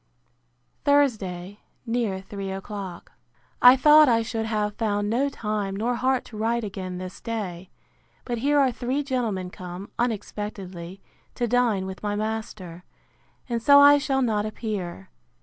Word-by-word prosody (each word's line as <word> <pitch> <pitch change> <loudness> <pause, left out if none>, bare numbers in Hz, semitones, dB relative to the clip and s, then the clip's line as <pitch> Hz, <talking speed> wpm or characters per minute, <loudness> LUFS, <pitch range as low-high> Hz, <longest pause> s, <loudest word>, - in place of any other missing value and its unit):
Thursday, 205 -10 +1 0.3
near 230 -5 -1
three 195 0 -6
o'clock. 195 -2 -7 0.5
I 250 +1 +9
thought 300 +2 +7
I 230 -1 +3
should 225 -1 -3
have 210 -2 -1
found 205 -1 -1
no 270 +5 +1
time 210 -6 -3
nor 230 +5 0
heart 255 +1 0
to 220 - -10
write 230 +2 0
again 185 -3 -5
this 185 0 -8
day. 190 -6 -5 0.6
But 240 -2 -3
here 290 +4 +2
are 270 -3 +4
three 255 +4 -2
gentlemen 225 -9 -2
come, 180 +2 -8
unexpectedly, 195 -5 -4 0.3
to 240 - -1
dine 235 -5 +2
with 190 0 -7
my 205 -1 -2
master; 210 -5 -5 0.6
and 235 -2 -2
so 285 +4 +7
I 285 0 +8
shall 270 -2 0
not 215 -4 +1
appear. 205 - -5
215 Hz, 145 wpm, -25 LUFS, 195-245 Hz, 0.6 s, I